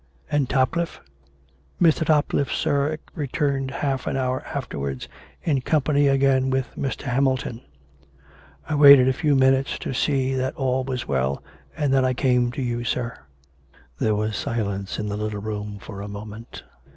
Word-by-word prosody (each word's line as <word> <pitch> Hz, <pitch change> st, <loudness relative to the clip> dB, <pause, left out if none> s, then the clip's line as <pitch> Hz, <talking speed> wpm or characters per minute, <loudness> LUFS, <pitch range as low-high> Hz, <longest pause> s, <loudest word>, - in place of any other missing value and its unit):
" -, -, -30 dB
And 140 Hz, -4 st, +1 dB
Topcliffe 140 Hz, +6 st, 0 dB, 0.3 s
" 70 Hz, 0 st, -35 dB
" 70 Hz, +1 st, -36 dB
Mr. 160 Hz, -, +1 dB
Topcliffe, 150 Hz, -2 st, +1 dB
sir, 145 Hz, +2 st, 0 dB, 0.2 s
returned 140 Hz, -3 st, -1 dB
half 135 Hz, -1 st, -2 dB
an -, -, -1 dB
hour 130 Hz, 0 st, -1 dB
afterwards 70 Hz, -, -4 dB, 0.4 s
in 140 Hz, -5 st, +1 dB
company 145 Hz, 0 st, +2 dB
again 135 Hz, -1 st, +3 dB
with 130 Hz, -1 st, -1 dB
Mr. 135 Hz, -, -3 dB
Hamilton. 130 Hz, -2 st, 0 dB, 1.1 s
I 155 Hz, -, -2 dB
waited 140 Hz, -3 st, +8 dB
a 130 Hz, -, +3 dB
few 145 Hz, +1 st, +1 dB
minutes 135 Hz, +1 st, +3 dB
to -, -, -5 dB
see 135 Hz, 0 st, +1 dB
that 130 Hz, 0 st, -1 dB
all 130 Hz, -1 st, 0 dB
was 130 Hz, -1 st, -4 dB
well, 65 Hz, +1 st, -1 dB, 0.3 s
and 145 Hz, -3 st, +1 dB
then 135 Hz, -1 st, +4 dB
I 130 Hz, 0 st, +1 dB
came 125 Hz, -1 st, +2 dB
to 135 Hz, -, -3 dB
you, 120 Hz, -1 st, -2 dB
sir." 120 Hz, 0 st, -2 dB, 0.9 s
There 110 Hz, -1 st, +2 dB
was 105 Hz, +1 st, -1 dB
silence 100 Hz, -4 st, -3 dB
in 105 Hz, -, -3 dB
the 105 Hz, 0 st, -3 dB
little 105 Hz, -1 st, -3 dB
room 105 Hz, 0 st, -5 dB
for 100 Hz, 0 st, -8 dB
a 100 Hz, -, -6 dB
moment. 105 Hz, +2 st, -9 dB
130 Hz, 165 wpm, -23 LUFS, 110-140 Hz, 1.1 s, waited